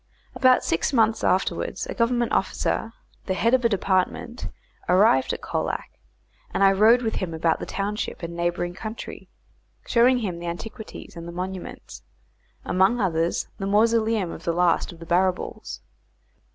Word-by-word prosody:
About 255 -1 +4
six 165 - 0
months 225 -4 +2
afterwards - - 0
a - - -5
Government 240 0 +1
officer, 225 - 0 0.4
the 190 - 0
head 230 +5 +2
of 255 -1 +4
a 235 - +4
department, 200 +4 -1 0.4
arrived 180 -8 +4
at - - -5
Colac, - - -3 0.6
and - - +1
I 195 - +7
rode 220 +5 +5
with 220 - -1
him 175 -4 -3
about 160 0 +1
the - - -6
township 200 -1 -3
and 170 0 -5
neighbouring 175 0 -1
country 215 +4 -8 0.6
showing 245 +2 +4
him 190 -8 -3
the 175 - -6
antiquities 215 +7 -7
and 170 0 -8
the - - -6
monuments, 185 +1 -7 0.6
among 190 +6 +3
others 170 -4 0
the 195 - -2
mausoleum 220 -2 +2
of 165 - -9
the 170 -1 0
last 175 0 +2
of 170 - -13
the 165 - -10
Barrabools. 175 - -1
195 Hz, 155 wpm, -24 LUFS, 175-225 Hz, 0.6 s, I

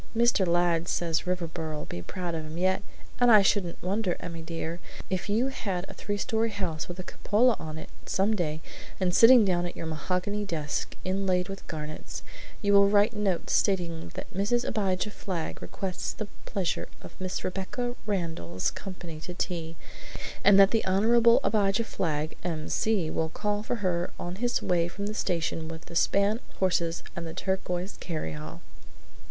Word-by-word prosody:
Mr. 235 -5 +4
Ladd 170 -1 +2
says 165 -2 0
Riverboro'll 165 -4 -2
be 85 - -6
proud 175 - -4
of 160 -1 -2
him 155 +1 -7
yet, 185 +1 +2 0.4
and 245 0 +6
I 210 -2 +8
shouldn't 195 -3 +1
wonder, 190 0 0
Emmy 170 -2 -6
dear, 165 +1 -4 0.3
if 185 +2 -1
you 230 +6 +2
had 195 -8 -3
a - - -8
three 205 0 -3
story 225 +1 +1
house 185 -7 -3
with 175 - -6
a 185 - -5
cupola 230 +6 +2
on 155 0 -6
it, - - -7 0.2
some 200 +3 +2
day; 155 -5 -1 0.4
and 180 -2 +1
sitting 235 +1 +8
down 175 -2 +1
at 175 - -8
your - - -4
mahogany 180 +6 -1
desk 155 -7 -2
inlaid 185 -1 +1
with 195 0 -7
garnets, 155 -1 -6 0.4
you 200 0 +3
will 200 0 +7
write 205 +3 +4
notes 200 -4 0
stating 175 -5 +1
that - - -7
Mrs. 205 +6 +1
Abijah 200 -1 0
Flagg 180 -6 -4
requests 185 -2 -4
the 215 - -5 0.2
pleasure 185 -4 -1 0.2
of - - -10
Miss 185 0 -2
Rebecca 195 +6 -2
Randall's 160 - -1
company 175 -5 -7
to 175 +3 -7
tea, 170 -3 -3 0.7
and 200 -1 +8
that 195 0 +8
the 225 - +2
Hon. 230 +5 +5
Abijah 205 0 +2
Flagg, 155 -7 -2
M.C., 170 +2 0
will 160 0 0
call 205 +4 -1
for 220 - -2
her 175 -1 +1
on 175 +1 -4
his 240 +2 0
way 170 -1 +2
from 200 +4 -5
the 210 - -2
station 165 -5 -1
with 160 0 -8
a - - -8
span 200 +5 +3
of - - -21
horses 170 -3 +1
and 170 -1 -4
the 160 - -7
turquoise 190 0 -2
carryall!" 80 - -5
185 Hz, 170 wpm, -28 LUFS, 165-205 Hz, 0.7 s, I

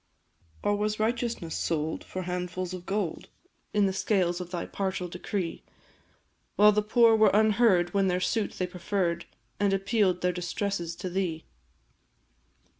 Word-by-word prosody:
Or 205 - +2
was 210 +1 -1
righteousness 230 -6 -1
sold 160 -1 -2
for 185 - -5
handfuls 180 0 -3
of 180 0 -8
gold 195 -4 -2 0.4
In 205 -1 +3
the 190 - 0
scales 185 -2 +1
of 175 - -7
thy 175 -1 -3
partial 190 -2 -3
decree; 180 0 -4 0.9
While 210 +1 +7
the 210 0 +2
poor 225 +1 +5
were 215 -1 +5
unheard 215 -4 +4
when 195 -1 +2
their 180 0 +1
suit 205 +3 0
they 185 - -2
preferr'd, 180 -1 -2 0.3
And 200 -1 +2
appeal'd 195 -2 +1
their 180 0 +1
distresses 175 -1 -3
to 185 - -5
thee? 175 -4 -2
190 Hz, 145 wpm, -28 LUFS, 180-210 Hz, 0.9 s, While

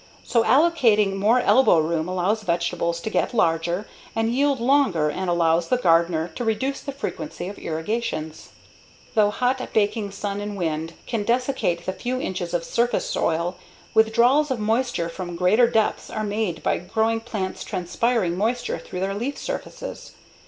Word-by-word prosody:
So 230 -2 +2
allocating 235 -7 +4
more 220 +6 +3
elbow 260 -8 +5
room 160 +1 0
allows 185 +4 0
vegetables 170 -2 -1
to 220 - -4
get - - 0
larger 170 +1 +1 0.3
and 225 +1 +1
yield 280 +1 +2
longer 235 - +2
and 185 +4 -3
allows 165 -1 +2
the 250 - +2
gardener 170 -4 +2
to 175 - -5
reduce 235 +5 -1
the 280 - -5
frequency 280 -5 -5
of 200 - -8
irrigations. 160 -2 -3 0.6
Though 210 -2 +4
hot, 250 +4 0
baking 210 -1 +1
sun 200 0 -4
and 205 0 -5
wind 165 -2 -2
can 230 -4 -2
desiccate 240 -6 0
the 185 - -2
few 250 +6 -3
inches 180 -6 -3
of 170 - 0
surface 235 +7 0
soil, 170 +2 -1 0.4
withdrawals 235 +7 +4
of 260 - 0
moisture 225 -4 0
from 175 0 -6
greater 190 +8 +4
depths 225 -2 0
are 215 - -3
made 205 -5 -2
by - - +1
growing 220 +5 0
plants 215 -5 -4
transpiring 190 0 0
moisture 240 +5 -1
through 180 - -7
their 195 +1 -1
leaf 245 +8 -3
surfaces. - - -6
210 Hz, 160 wpm, -23 LUFS, 175-240 Hz, 0.6 s, elbow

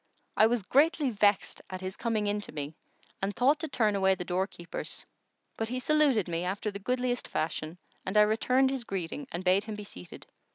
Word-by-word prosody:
I 220 - +6
was 235 -2 0
greatly 285 - +3
vexed 205 -2 +2
at 185 0 -6
his 185 0 -4
coming 225 -3 -1
in 205 0 0
to - - -8
me 145 0 -5 0.5
and 195 +1 -1
thought 275 +5 +3
to 320 - -3
turn 220 -7 +1
away 190 -1 +3
the 180 - -6
doorkeepers; 180 -1 -3 0.5
but 225 0 -1
he 250 - -2
saluted 270 - +3
me 170 0 -2
after 200 +4 -2
the 200 - -6
goodliest 250 +3 -1
fashion 155 +1 -3 0.3
and 190 +3 -1
I - - +9
returned 250 +5 +3
his 265 -3 -2
greeting 195 - -4
and 175 - -4
bade 190 +3 +3
him 220 -1 -5
be 210 - -7
seated. 90 - -10
210 Hz, 200 wpm, -29 LUFS, 185-250 Hz, 0.5 s, I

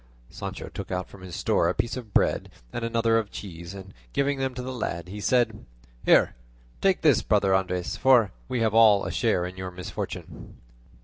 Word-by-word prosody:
Sancho - - -6
took - - -7
out 90 0 -2
from 100 - -13
his 90 -2 -8
store 85 - +2
a 90 - -1
piece 115 +3 -1
of 120 -5 -8
bread - - +2 0.2
and 120 - -3
another 115 0 +2
of 105 -2 -4
cheese, 85 -2 -8
and 95 -1 -10 0.2
giving 140 0 +1
them 130 -1 -1
to 125 - -5
the 130 +1 -4
lad 90 -7 -4
he 105 +2 -6
said, 125 +2 +1 0.4
"Here, - - +5 0.5
take 190 -2 +3
this, 145 -8 +5
brother 100 -2 +2
Andres, 90 -2 0
for 125 -6 +5 0.2
we 120 - -1
have 110 -2 +2
all 110 -3 +7
of - - -3
us - - -5
a - - -5
share 90 - +2
in 90 +1 -7
your 95 0 -4
misfortune." 90 0 -7
105 Hz, 205 wpm, -26 LUFS, 95-120 Hz, 0.5 s, all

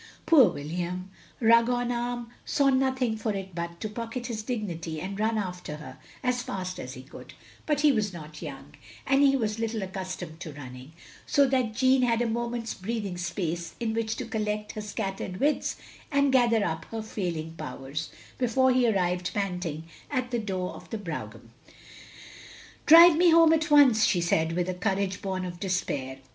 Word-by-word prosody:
Poor 275 - +7
William, 175 +4 -4 0.3
rug 230 0 +5
on 245 0 0
arm, 240 0 -3
saw 280 -2 +2
nothing 260 -3 +1
for 215 0 -2
it 190 -1 -6
but 170 0 -5
to 215 - -3
pocket 230 +3 -5
his 230 -3 -3
dignity 175 -9 -4
and 195 +4 -5
run 220 +1 +1
after 180 -6 -4
her 150 - -10 0.2
as 250 -1 +1
fast 185 -4 -5
as 130 +1 -7
he 130 - -10
could; 135 - -12 0.3
but 300 -2 +1
he 300 -1 +6
was 215 -5 0
not 155 -3 -10
young, 145 -2 -8 0.3
and 270 +1 +3
he 275 -1 +5
was 220 -4 -1
little 225 -2 -2
accustomed 185 -4 -6
to 165 -4 -7
running, 130 0 -10 0.4
so 280 - +4
that 255 -5 0
Jeanne 260 +1 +4
had 235 -2 +2
a 240 - +1
moment's 235 0 -2
breathing 205 -1 -4
space 175 -1 -3
in 225 -2 -1
which 225 0 -1
to - - -5
collect 210 -1 -2
her 215 - -6
scattered 195 -3 -4
wits 295 +2 +1 0.4
and 280 -1 +3
gather 235 -4 +4
up 160 0 -3
her 225 -1 -5
failing 170 -7 -4
powers, 140 +1 -6 0.3
before 260 +1 +3
he 250 -1 +3
arrived, 180 -3 0
panting, 180 -6 -2 0.3
at 255 -3 -2
the 240 - 0
door 190 -4 -3
of - - -12
the 225 - -3
brougham. 170 -7 -7 1.4
"Drive 335 +1 +10
me 345 +2 +5
home 330 -1 +7
at 315 0 +1
once," 270 -7 +6
she 180 - +2
said 165 -1 +1
with 175 +1 0
a 185 - -1
courage 190 0 -1
bom 190 -1 -3
of 175 -1 -7
despair. 145 -9 -2
210 Hz, 180 wpm, -27 LUFS, 175-245 Hz, 1.4 s, Drive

